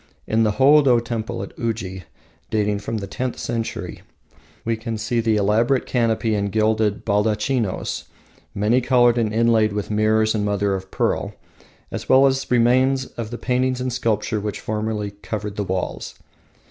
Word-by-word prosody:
In 110 +1 +1
the 110 -2 +2
Hoodo 135 0 +5
temple 115 0 -4
at - - -10
Uji, 100 -6 -3 0.4
dating 105 -2 0
from 110 +2 -4
the 100 - -4
tenth 125 +5 -4
century, 115 -1 -4 0.6
we 115 0 +1
can 110 0 -5
still 110 +2 -2
see - - +4
the 110 -1 +1
elaborate 110 +6 +2
canopy 115 -2 0
and 100 -1 -1
gilded 110 0 +1
baldachinos, 105 +1 0 0.5
many 110 +5 +2
coloured 120 -1 +4
and 110 -2 0
inlaid 110 -1 +3
with 105 0 -3
mirrors 110 +1 +2
and 105 -2 -1
mother 100 -1 0
of 95 0 -5
pearl, - - -1 0.6
as - - -6
well 130 +1 +6
as 135 0 +1
remains 130 +2 +3
of 115 -2 -5
the 120 - -5
paintings 130 0 0
and 125 -1 -2
sculpture 110 -2 0
which 105 0 -4
formerly 105 -1 -3
covered 105 0 -6
the 105 - -2
walls. 95 -1 -4
110 Hz, 160 wpm, -22 LUFS, 105-120 Hz, 0.6 s, well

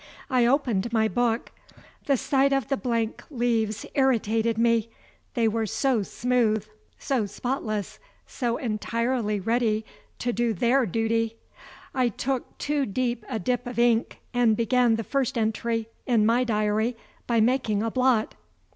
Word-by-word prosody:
I 250 -2 +4
opened 240 -5 +1
my 220 -1 +3
book. 240 0 0 0.6
The 275 -2 +3
sight 275 +2 +2
of 270 -4 0
the 275 - +2
blank 230 -4 -2
leaves 230 -5 0
irritated 230 -4 +2
me; 230 -1 +2 0.5
they 230 -2 +3
were 220 0 0
so 230 +2 +1
smooth, 220 -1 0 0.3
so 250 -7 -1
spotless, 215 -2 -3 0.3
so 240 -3 -2
entirely 230 -1 -1
ready 220 +1 0 0.3
to 245 0 -1
do 235 +1 +1
their 245 +5 +2
duty. 225 +3 0 0.6
I 255 -2 +2
took 255 +4 -3
too 290 -2 -1
deep 240 +2 -1
a 240 - -2
dip 245 +4 -1
of 245 - -6
ink, 235 0 +2 0.2
and 235 -3 +3
began 240 0 +3
the 225 - -3
first 270 +1 -1
entry 225 0 -1 0.2
in 230 -4 +3
my 240 +3 +3
diary 215 +1 0 0.3
by 235 -1 +2
making 220 -3 +2
a 225 - -1
blot. 255 -3 +2
235 Hz, 145 wpm, -26 LUFS, 220-250 Hz, 0.6 s, I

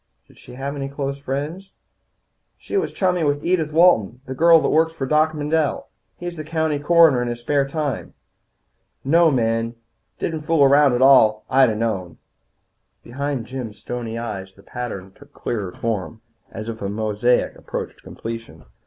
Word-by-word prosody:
"Did - - -21
she - - -13
have 135 +3 -5
any 135 -1 -4
close 140 0 -4
friends?" 145 +8 -4 0.9
"She - - -7
was 395 - 0
chummy 180 -3 0
with 145 +1 0
Edith 170 -3 +1
Walton, 150 - +4
the 130 - -5
girl 165 +4 +6
that - - 0
works 160 +1 +2
for 145 -5 -4
Doc 155 +3 +2
Mendel. 150 0 -1 0.3
He's 175 -2 -6
county 160 -1 -1
coroner 160 -4 +5
in 125 - -2
his 120 0 -4
spare 140 +2 +1
time. 145 -3 -4 0.9
No 165 +4 +4
men. 115 -3 0 0.4
Didn't 160 -2 -3
fool 155 -1 +2
around 140 0 +5
at 120 +1 +2
all. 110 -6 +5
I'd 135 -2 +5
a 110 - -1
known." 105 -6 -3 0.9
Behind 140 0 -4
Jim's 125 -4 -6
stony 115 -2 -5
eyes 95 -5 -6
the 100 - -18
pattern 100 -5 -6
took - - -19
clearer 100 -6 -4
form, 110 0 -4 0.3
as 110 0 -7
if 115 -1 -6
a 100 - -2
mosaic 110 +3 0
approached - - -6
completion. 115 - -8
135 Hz, 160 wpm, -21 LUFS, 115-155 Hz, 0.9 s, girl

